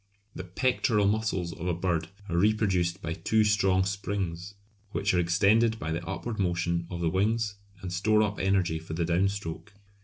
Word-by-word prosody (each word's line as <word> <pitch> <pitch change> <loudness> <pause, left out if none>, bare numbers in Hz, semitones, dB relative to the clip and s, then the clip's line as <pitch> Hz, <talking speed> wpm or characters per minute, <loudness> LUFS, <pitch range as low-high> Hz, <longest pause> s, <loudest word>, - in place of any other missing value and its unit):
The 95 - -6
pectoral 105 +2 +1
muscles 100 -5 0
of 90 -2 -6
a 90 - +1
bird 85 -2 -1 0.2
are 85 - -3
reproduced 95 -2 +1
by 85 - -2
two 110 +5 +2
strong 95 -3 +3
springs 95 -1 -3 0.4
which 100 - +1
are 90 - +3
extended 100 +6 +3
by 80 -5 -4
the 85 +2 -2
upward 110 +5 -4
motion 85 -2 0
of 85 -1 -5
the 85 - +2
wings 105 +3 +1 0.3
and 90 -1 -4
store 105 +4 +3
up 105 -1 -2
energy 95 -4 +1
for 80 0 -8
the 85 0 0
down 90 +3 +2
stroke. 100 +1 -6
95 Hz, 180 wpm, -28 LUFS, 85-105 Hz, 0.4 s, strong